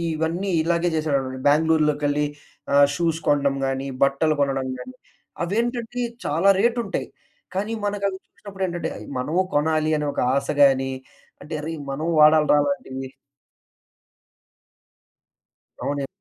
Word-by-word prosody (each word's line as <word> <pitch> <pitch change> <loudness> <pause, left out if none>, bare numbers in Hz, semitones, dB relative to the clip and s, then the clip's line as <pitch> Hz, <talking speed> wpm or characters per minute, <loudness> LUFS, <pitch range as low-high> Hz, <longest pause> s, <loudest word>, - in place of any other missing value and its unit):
ఇవన్నీ 165 +5 -2
ఇలాగే 170 +2 +1
చేశాడన్నమాట. 140 -4 -1
బెంగుళూరులోకెళ్ళి 150 -1 +2 0.5
ఆహ్, 140 0 +7
షూస్ 165 -1 0
కొనడం 140 -1 +2
గాని, 135 0 -2 0.2
బట్టలు 140 +3 +2
కొనడం 135 -1 0
గాని 255 - -9 0.5
అవేంటంటే 235 +5 -2 0.2
చాలా 165 +7 +3
రేటుంటాయి. 235 +2 0 0.5
కానీ 210 +4 -1
మనకవి 200 -1 -1
చూసినప్పుడేంటంటే, 185 -5 -5
అయి - - -10
మనము 155 +8 -1
కొనాలి 155 +1 +1
అనే 150 - -2
ఒక - - -1
ఆశ 140 0 -1 0.2
గాని, 135 -1 +3 0.5
అంటే 150 +3 -9
అరేయ్! 160 +1 -5
మనం 150 +4 -3
వాడాలిరా 150 -1 +6
అలాంటివి 135 - -4 2.7
అవునండి. 140 -1 -2
155 Hz, 110 wpm, -23 LUFS, 140-185 Hz, 2.7 s, ఆహ్